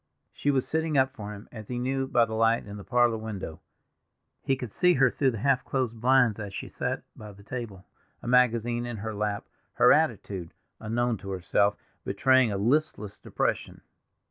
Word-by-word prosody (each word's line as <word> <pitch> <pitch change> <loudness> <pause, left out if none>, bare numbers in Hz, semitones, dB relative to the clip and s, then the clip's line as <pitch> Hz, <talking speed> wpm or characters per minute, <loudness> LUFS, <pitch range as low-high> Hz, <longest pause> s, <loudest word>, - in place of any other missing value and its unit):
She 145 - -1
was 135 -2 +1
sitting 160 -2 0
up 130 0 +3
for 105 -5 -7
him, 105 0 -10
as 110 -3 -9
he 125 - -4
knew 135 +2 -1
by 120 -3 +3
the 110 - -7
light 115 +1 +2
in 100 0 -8
the 100 - -9
parlor 120 -1 +2
window. 100 -7 -6 0.8
He 135 -1 +1
could 125 -5 -7
see 180 - +3
her 130 -2 +4
through 135 - +1
the 115 - -3
half 130 +3 +2
closed 120 -4 -2
blinds 125 -4 +4
as 100 -2 -6
she - - -6
sat - - -3
by 105 -1 -10
the 100 +1 -16
table, 105 -5 -7 0.3
a - - -10
magazine 120 -1 +2
in 120 -2 -5
her 110 +2 -5
lap, 105 0 -2 0.3
her - - +6
attitude, 90 -4 -1 0.2
unknown 115 +1 -1
to 100 +1 -9
herself, 95 +2 +1 0.3
betraying 130 +4 +3
a 100 - -1
listless 115 -2 0
depression. - - -2
115 Hz, 190 wpm, -27 LUFS, 105-130 Hz, 0.8 s, her